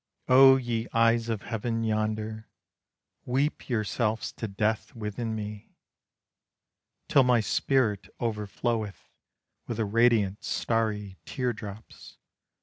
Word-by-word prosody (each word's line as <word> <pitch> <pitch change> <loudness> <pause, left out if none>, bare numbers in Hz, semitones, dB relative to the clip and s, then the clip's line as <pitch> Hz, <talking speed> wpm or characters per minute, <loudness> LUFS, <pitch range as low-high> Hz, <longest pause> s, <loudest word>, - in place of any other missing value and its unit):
Oh 135 +1 +8
ye 120 -2 -2
eyes 115 0 +3
of 110 -3 -2
heaven 115 0 -2
yonder, 110 0 -2 0.7
Weep 135 +5 -1
yourselves 110 -1 -1
to 110 - -5
death 110 +5 -1
within 110 +1 -4
me! 105 -1 -7 1.3
Till 140 - +5
my 125 -2 +4
spirit 105 -4 +1
overfloweth 110 -1 -3 0.6
With 115 - -4
the 110 - 0
radiant 110 -2 +2
starry 105 -4 -1
tear 125 -2 -1
drops. 105 -1 -10
110 Hz, 105 wpm, -28 LUFS, 105-120 Hz, 1.3 s, Oh